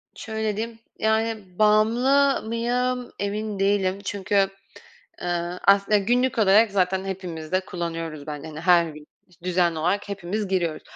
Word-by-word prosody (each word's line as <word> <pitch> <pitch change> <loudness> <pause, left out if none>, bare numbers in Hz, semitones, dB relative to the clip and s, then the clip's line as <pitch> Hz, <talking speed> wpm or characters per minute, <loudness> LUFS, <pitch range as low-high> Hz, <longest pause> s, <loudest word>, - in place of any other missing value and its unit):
Şöyle 220 -2 -3
diyeyim, 225 +1 -4 0.2
yani, 220 -4 -1
bağımlı 240 +7 +3
mıyım 245 +2 -1
emin 205 0 -3
değilim. 195 -1 +1
Çünkü, 195 0 +1 0.7
ııı, 175 0 -2
aslın 200 0 +4
günlük 250 +1 +2
olarak 210 +1 +5
zaten 190 -1 +1
hepimiz 180 -5 -6
de 185 - +3
kullanıyoruz. 165 -5 -5
Ben, 150 -2 -6
hani, 155 -1 -7
her 170 0 +5
gün 150 0 -12 0.2
iş 180 -1 -26
düzenli 175 -2 +1
olarak 185 +6 0
hepimiz 200 +1 -3
giriyoruz. 175 -4 -1
195 Hz, 135 wpm, -24 LUFS, 175-220 Hz, 0.7 s, olarak